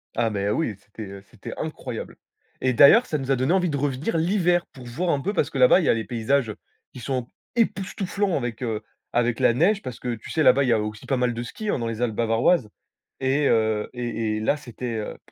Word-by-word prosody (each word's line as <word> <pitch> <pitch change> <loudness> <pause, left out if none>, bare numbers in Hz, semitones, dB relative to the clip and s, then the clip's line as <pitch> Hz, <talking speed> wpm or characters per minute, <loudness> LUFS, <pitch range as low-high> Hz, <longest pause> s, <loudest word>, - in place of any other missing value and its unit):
Ah, 115 -1 +1
mais 100 -1 -1
oui, 115 -3 0
c'était, 105 +1 -10
heu, 100 0 -9
c'était - - -10
incroyable, - - -5 0.5
et 130 -1 +2
d'ailleurs, 180 - +7
ça 155 - -1
nous 135 -1 -3
a - - +4
donné 130 +5 0
envie 180 -3 +2
de 140 - -1
revenir 140 - -1
l'hiver, 175 +1 +2
pour 130 -5 -12
voir 165 +10 -2
un 145 - +2
peu, 200 +9 -2
parce - - +1
que - - -5
là-bas, 130 +8 +6
il 165 - 0
y - - +2
a - - +6
les 110 - -2
paysages 120 -1 0 0.4
qui - - -9
sont 125 -1 -3 0.3
époustouflants 200 -3 0
avec, 120 -2 -4
heu, 110 -3 -2 0.3
avec 120 +1 +1
la 125 -2 +4
neige, 195 - +3
parce 125 -4 -7
que 125 -1 -3
tu 110 - -9
sais? 155 - +1
Là-bas, 140 - +6
il - - 0
y - - +4
a 110 - +2
aussi 105 0 -5
pas 135 - +1
mal 125 -1 +1
de 115 - -4
ski, 210 - -6
hein, - - 0
dans 115 - -2
les 115 0 -4
Alpes 115 -3 0
bavaroises, 115 +4 +2 0.5
et 135 +2 +2
heu, 110 -1 +1
et 115 -3 -2
et 110 - -2
là 110 - +1
c'était 125 -4 -6
heu 105 - -5
125 Hz, 245 wpm, -24 LUFS, 115-155 Hz, 0.5 s, d'ailleurs